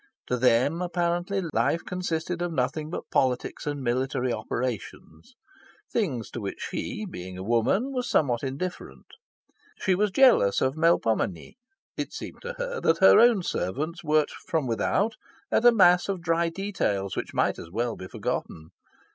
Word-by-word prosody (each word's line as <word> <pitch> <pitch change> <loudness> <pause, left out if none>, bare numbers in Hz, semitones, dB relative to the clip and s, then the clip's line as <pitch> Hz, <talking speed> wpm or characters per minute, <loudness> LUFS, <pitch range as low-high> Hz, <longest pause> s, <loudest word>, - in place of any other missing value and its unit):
To 125 - +2
them, 130 +7 +3
apparently, 175 +2 -1
life 170 - +1
consisted 175 -1 -3
of 175 -1 -1
nothing 150 +2 -1
but 175 - -6
politics 130 +2 0
and 145 -2 -3
military 130 0 0
operations 105 -9 -5 0.6
things 135 - -1
to 120 - -5
which 100 - -5
she, 215 - -4
being 90 - -8
a 95 - -6
woman, 120 - +1
was 250 -2 -2
somewhat 125 -6 +2
indifferent. 140 +7 -5 0.7
She 190 - +2
was 205 +3 +2
jealous 215 - +5
of 130 - +1
Melpomene. 115 - +1 0.4
It - - -4
seemed - - -8
to 485 +1 -5
her - - -4
that 165 - +3
her 190 - +7
own 230 -5 +5
servants 155 - -3
worked 155 -1 +2
from 160 -4 -3
without 190 - 0 0.3
at 240 - +2
a 240 - +9
mass 180 -4 +5
of 195 -2 -1
dry 165 0 +1
details 165 - -2
which - - -5
might - - +1
as - - -9
well 115 +5 -2
be 95 - -8
forgotten. 80 -3 -4
160 Hz, 155 wpm, -26 LUFS, 120-185 Hz, 0.7 s, a